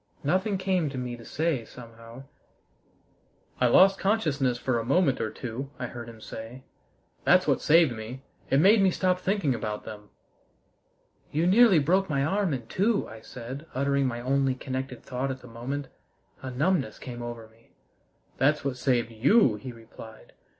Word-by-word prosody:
Nothing 190 +7 +1
came 185 -4 0
to 135 - -7
me 125 -1 -4
to 120 - -13
say, 155 -4 -1
somehow. 115 +1 -12 1.4
"I 125 - +4
lost 190 +10 +6
consciousness 150 - +1
for 125 -1 -1
a - - -3
moment 140 +1 +2
or 110 - -1
two," 125 +4 -6
I 125 - -4
heard 120 -1 -8
him 115 -1 -12
say. 115 +4 -9 0.6
"That's - - +4
what - - +2
saved 160 -2 +5
me. 120 +4 -8 0.3
It 135 - +3
made 200 +6 +6
me 195 - +5
stop 185 0 +1
thinking 185 -7 0
about 105 -2 -4
them." 105 -1 -10 1.2
"You 160 +3 +1
nearly 200 +1 +6
broke 180 +6 +2
my 140 -2 +1
arm 195 +2 0
in 125 -4 -3
two," 205 - 0
I 110 0 -11
said, 130 +7 -8
uttering 140 0 +1
my 120 -1 -4
only 135 +1 +1
connected 130 -1 -5
thought 130 +1 -3
at 130 0 -5
the 125 - -12
moment. 125 +5 -5 0.5
A 130 - -5
numbness 135 - 0
came 120 -2 -8
over 120 -2 -7
me. 115 +1 -27 0.6
"That's 145 +2 +2
what 135 -2 -2
saved 125 -3 0
you!" 130 - +4
he 125 +5 -8
replied. 115 -1 -13
130 Hz, 170 wpm, -27 LUFS, 120-165 Hz, 1.4 s, lost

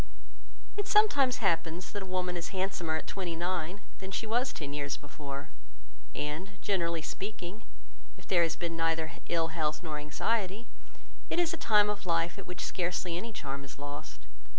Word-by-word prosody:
It 410 0 0
sometimes 280 - +5
happens 165 0 +2
that 205 - -3
a 190 - -5
woman 185 -1 0
is 170 -1 -2
handsomer 185 -4 0
at - - -2
twenty 180 -4 -2
nine 175 +2 -1 0.2
than 190 -1 -5
she 195 - -1
was 240 +4 +2
ten 145 -2 -4
years 145 -1 -1
before; 145 -1 -6 0.7
and, 180 +7 -3
generally 170 -5 +1
speaking, 200 +2 -4 0.6
if - - -15
there 175 -2 +5
has 165 -1 +3
been 170 -1 -2
neither 165 -1 +2 0.2
ill 165 -1 +3
health 155 0 0
nor 155 -3 -2
anxiety, 195 +7 0 0.6
it - - +1
is 345 -1 +4
a - - +2
time 210 -9 +5
of 205 -2 -2
life 170 +2 +2
at 195 - -8
which 180 0 -3
scarcely 180 -1 0
any 225 +7 -3
charm 140 -8 -4
is 135 +1 -9
lost. 145 +1 -6
175 Hz, 175 wpm, -32 LUFS, 160-200 Hz, 0.7 s, sometimes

